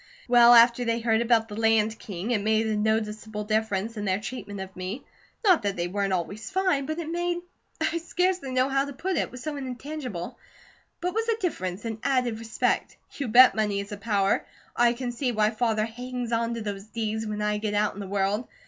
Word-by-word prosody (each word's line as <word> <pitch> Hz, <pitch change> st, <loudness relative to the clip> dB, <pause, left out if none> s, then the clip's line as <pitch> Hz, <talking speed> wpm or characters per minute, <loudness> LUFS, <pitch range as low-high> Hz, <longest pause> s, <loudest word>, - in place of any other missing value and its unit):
Well, 240 Hz, -1 st, +8 dB
after 235 Hz, +1 st, +6 dB
they 230 Hz, -1 st, +1 dB
had 230 Hz, -, -5 dB
heard 225 Hz, -1 st, +3 dB
about 230 Hz, -1 st, +3 dB
the 205 Hz, -, -8 dB
Land 225 Hz, 0 st, +2 dB
King, 200 Hz, +3 st, -5 dB
it 220 Hz, -4 st, +1 dB
made 220 Hz, +1 st, +2 dB
a 220 Hz, -1 st, 0 dB
noticeable 215 Hz, 0 st, -1 dB
difference 215 Hz, 0 st, -1 dB
in 210 Hz, -, -3 dB
their 190 Hz, 0 st, +1 dB
treatment 205 Hz, -3 st, -6 dB
of 190 Hz, 0 st, -7 dB
me. 185 Hz, +8 st, -5 dB, 0.4 s
Not 370 Hz, -6 st, +5 dB
that 200 Hz, -2 st, -1 dB
they 175 Hz, 0 st, -1 dB
weren't 200 Hz, +1 st, -1 dB
always 190 Hz, +4 st, -3 dB
fine, 370 Hz, -8 st, +1 dB
but 310 Hz, +1 st, -3 dB
it 335 Hz, -2 st, -4 dB
made, 345 Hz, +1 st, -1 dB, 0.4 s
I 325 Hz, +1 st, 0 dB
scarcely 360 Hz, -3 st, -1 dB
know 255 Hz, 0 st, +2 dB
how 270 Hz, 0 st, +1 dB
to 285 Hz, -, -7 dB
put 370 Hz, +7 st, -2 dB
it, -, -, +1 dB
it -, -, -2 dB
was 250 Hz, -1 st, -9 dB
so 305 Hz, 0 st, -3 dB
intangible 260 Hz, -, -6 dB, 0.6 s
but 355 Hz, -, 0 dB
it -, -, -7 dB
was 450 Hz, +2 st, -1 dB
a 450 Hz, -, +2 dB
difference, 200 Hz, -, -3 dB
an 225 Hz, -1 st, -4 dB
added 250 Hz, -5 st, 0 dB
respect. 225 Hz, -1 st, -1 dB
You 280 Hz, -, -4 dB
bet 250 Hz, +3 st, +8 dB
money 210 Hz, -2 st, 0 dB
is 200 Hz, +1 st, -6 dB
a 205 Hz, -, -5 dB
power! 200 Hz, -2 st, +1 dB, 0.3 s
I 240 Hz, 0 st, +4 dB
can 245 Hz, 0 st, -4 dB
see 245 Hz, +1 st, -1 dB
why 215 Hz, -1 st, +2 dB
Father 220 Hz, -2 st, 0 dB
hangs 245 Hz, +1 st, -5 dB
on 230 Hz, 0 st, 0 dB
to 230 Hz, -, -4 dB
those 200 Hz, -2 st, -5 dB
deeds, 220 Hz, 0 st, -3 dB
when 210 Hz, 0 st, -3 dB
I 210 Hz, 0 st, 0 dB
get 210 Hz, -1 st, -2 dB
out 210 Hz, 0 st, +2 dB
in 200 Hz, -, -10 dB
the 200 Hz, -, -5 dB
world. 200 Hz, +4 st, 0 dB
225 Hz, 225 wpm, -26 LUFS, 210-255 Hz, 0.6 s, Well